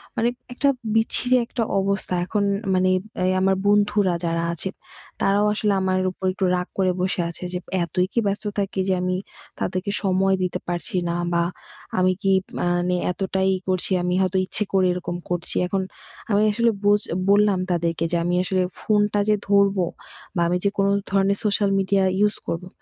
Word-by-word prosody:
মানে 235 +1 +2 0.2
একটা 280 +3 +2 0.3
বিচ্ছিরি 245 +3 +2
একটা 235 0 -2 0.2
অবস্থা 195 -1 -1
এখন 205 +2 0 0.3
মানে 185 0 +3 0.4
এ - - +2
আমার 190 0 +3
বন্ধুরা 205 -2 +3
যারা 165 0 0
আছে 170 +3 -4 0.5
তারাও 200 +1 +3
আসলে 210 -1 +1
আমার 185 0 +1
উপর 190 - -7
একটু 190 0 -1
রাগ 180 +1 -2
করে 185 -1 +3
বসে 180 -1 0
আছে 170 - -9
যে, 180 - -1 0.2
এতই 180 +2 0
কী - - +2
ব্যস্ত 200 +2 -2 0.2
থাকি? 195 -1 -2
যে, 190 - +3
আমি 185 0 0 0.4
তাদেরকে 185 +2 -2
সময় 190 0 +2
দিতে 180 - -2
পারছি 175 0 -4
না 170 - -1 0.2
বা 170 0 +3 0.6
আমি 185 0 +3
কী? 195 - +3 0.3
মানে 175 +1 +1 0.2
এতটাই 190 +1 0 0.2
করছি 185 +1 -1
আমি 180 0 0
হয়তো 190 0 +1
ইচ্ছে 205 - -2
করি 190 -1 +4
এরকম 175 -1 -4
করছি 175 -1 -3
এখন 195 +1 0 0.5
আমি 205 0 +3
আসলে 235 +2 +2
বোঝ 205 0 +4 0.3
বললাম 205 -1 +4
তাদেরকে 165 -1 0
যে, 170 - +2
আমি 175 +1 0
আসলে 185 0 +1 0.2
ফোনটা 205 -1 +2
যে, 210 - +5
ধরবো 200 -2 +4 0.5
বা 170 - +1
আমি 175 +1 +1
যে, 200 - +3
কোনো 195 0 +3 0.2
ধরনের 195 0 +2
সোশ্যাল 205 -1 +2
মিডিয়া 195 0 +2 0.2
ইউজ 210 0 +3
করবো 175 +2 -3
190 Hz, 175 wpm, -23 LUFS, 180-205 Hz, 0.6 s, যে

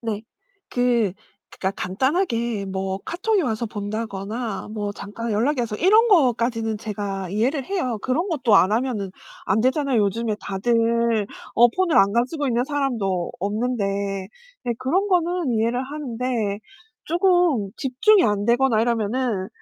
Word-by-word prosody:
네. 220 -3 -3 0.5
그 240 -5 +1 0.4
그니까 190 - -2
간단하게 235 - 0
뭐 190 0 -3
카톡이 390 +5 0
와서 235 -4 -1
본다거나 210 +1 -4
뭐 205 -1 -2
잠깐 210 +4 -6
연락이 245 +6 +1
와서 225 -3 -2
이런 430 - +5
거까지는 235 - +2
제가 200 -3 -4
이해를 250 +8 0
해요. 260 - -2
그런 300 +8 0
것도 250 - +3
안 190 +2 +4
하면은 220 -5 -1 0.4
안되잖아요. 255 +4 +2
요즘에 215 +2 0
다들 230 +1 +1 0.3
어 240 +1 +7
폰을 355 +5 0
안 195 +1 +5
가지고 260 +6 0
있는 240 0 +1
사람도 235 - -1
없는데. 215 +3 -1 0.8
네 240 - 0
그런 350 +11 +1
거는 350 -6 +1
이해를 230 +3 +1
하는데 250 -7 -3 0.5
쪼금 345 - +2
집중이 345 +10 +3
안 205 -1 +1
되거나 240 -1 +3
이러면은 225 -3 0
235 Hz, 295 characters per minute, -23 LUFS, 210-270 Hz, 0.8 s, 어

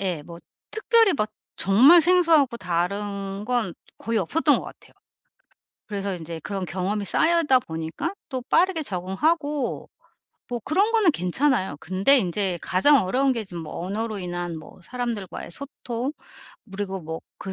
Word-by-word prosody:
예 180 -6 -2
뭐 170 +2 -11 0.3
특별히 445 -2 +4
막 215 -2 -1 0.3
정말 260 - +7
생소하고 325 -7 +4
다른 195 +2 -2
건 235 -6 -1 0.2
거의 230 0 -1
없었던 215 - +2
것 - - -4
같아요. - - -13 0.9
그래서 200 -2 -3
인제 165 -1 -7
그런 195 +2 -4
경험이 195 +4 -2
쌓이다 320 - +3
보니까 160 - -4 0.2
또 260 -3 -4
빠르게 360 -2 +3
적응하고 285 - -1 0.6
뭐 240 -1 -3
그런 390 +9 +2
거는 435 -6 +5
괜찮아요. 190 - 0
근데 195 - +4
인제 185 -2 -1
가장 250 +7 +4
어려운 260 +8 +2
게 230 -2 -3
지금 175 -4 -7
뭐 155 +2 -6
언어로 215 +3 -3
인한 175 -2 -4
뭐 160 +4 -14
사람들과의 235 -4 -5
소통, 255 - -5 0.6
그리고 195 -1 -4
뭐 160 0 -6 0.2
그 190 - -5
205 Hz, 300 characters per minute, -24 LUFS, 180-280 Hz, 0.9 s, 정말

